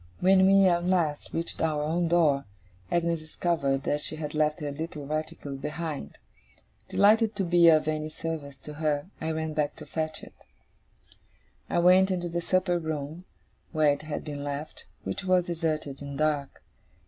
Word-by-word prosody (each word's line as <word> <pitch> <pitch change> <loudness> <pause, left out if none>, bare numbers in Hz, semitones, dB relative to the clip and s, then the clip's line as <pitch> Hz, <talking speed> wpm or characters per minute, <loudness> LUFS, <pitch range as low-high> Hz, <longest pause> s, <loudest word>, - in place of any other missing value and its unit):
When 190 +1 +5
we, 195 0 +6
at 175 -2 +3
last, 170 -5 0
reached 165 +1 -3
our 155 -2 +1
own 170 +3 0
door, 155 -5 +3 0.4
Agnes 170 -1 +1
discovered 155 -4 -1
that 145 +1 0
she 155 - -2
had 150 -1 -5
left 155 0 +1
her 145 -1 -3
little 150 0 -6
reticule 150 -2 -4
behind. 150 - -5 0.7
Delighted 220 +2 +4
to 200 - 0
be 175 -1 +5
of 155 -1 +4
any 155 0 -1
service 155 -3 -5
to 150 - -9
her, 150 +3 0
I 160 - -2
ran 160 -1 -2
back 150 -1 -1
to 155 - -10
fetch 155 +1 -3
it. - - -12 1.4
I - - 0
went 185 +2 +6
into 175 -2 -1
the 170 +1 -2
supper 185 0 +1
room 160 +2 -5 0.5
where 155 -2 +4
it 145 - -6
had 155 -1 -5
been 145 -2 -6
left, 145 +2 -6 0.2
which - - -4
was 185 -2 +3
deserted 155 -5 -2
and 140 -1 -6
dark. 150 -2 -1
155 Hz, 170 wpm, -28 LUFS, 150-175 Hz, 1.4 s, we